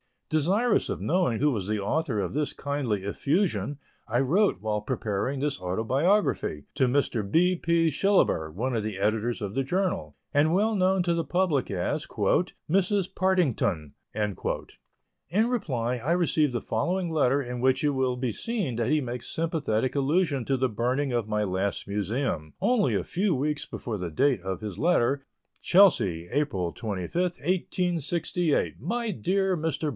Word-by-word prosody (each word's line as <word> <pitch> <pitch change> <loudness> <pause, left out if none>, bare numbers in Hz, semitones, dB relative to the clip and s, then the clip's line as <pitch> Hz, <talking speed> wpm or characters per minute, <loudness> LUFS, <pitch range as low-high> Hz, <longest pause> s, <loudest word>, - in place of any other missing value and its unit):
Desirous 195 +10 +2
of - - -3
knowing 170 -10 +1
who 150 0 +4
was 100 -7 -3
the 105 0 0
author 125 +1 0
of 90 - -3
this 150 +1 -1
kindly 135 -9 -2
effusion, 140 - 0 0.3
I 120 +2 +1
wrote, 155 - +2
while 105 -1 -1
preparing 115 +3 -2
this 145 -8 -1
autobiography, 115 - +1
to 135 -3 +3
Mr. 120 -6 0
B. 180 - +3
P. 170 -1 +2
Shillaber, 150 - +2
one 125 +10 -2
of 115 - 0
the 105 -2 -4
editors 110 +4 0
of 100 -1 -4
the 135 - +2
journal, 185 +7 -1 0.2
and 150 +3 +3
well 215 +3 +2
known 190 -2 +2
to 175 -1 +1
the 165 -1 -1
public 175 -7 +1
as 90 -3 -2
"Mrs. 195 +2 0
Partington." 135 - +1 0.2
In 130 - -3
reply, 125 - -1
I 130 +7 -2
received 155 -5 +2
the 120 - -1
following 175 +9 -1
letter 145 -3 +2
in 125 -2 -5
which 130 +3 +2
it 150 - +3
will 130 -2 0
be 125 -1 -2
seen 190 - -3
that 120 0 0
he 155 0 +3
makes 120 -1 -5
sympathetic 145 -8 -1
allusion 145 -2 +1
to 135 - +1
the 130 0 +1
burning 125 +5 0
of 120 -3 -1
my 105 0 0
last 100 +1 -2
Museum, 100 - -2
only 220 +1 +2
a - - 0
few 185 -1 0
weeks 150 +3 -1
before 115 -3 -5
the 90 -2 -4
date 130 - +2
of 95 +1 -4
his 105 -4 -6
letter: 140 -4 +2 0.4
CHELSEA, 95 - +4
April 120 - 0
25, 100 - -5
1868. 175 -1 0
MY 230 +6 -2
DEAR 190 +1 0
MR. 160 -1 -1
140 Hz, 160 wpm, -27 LUFS, 110-175 Hz, 0.4 s, who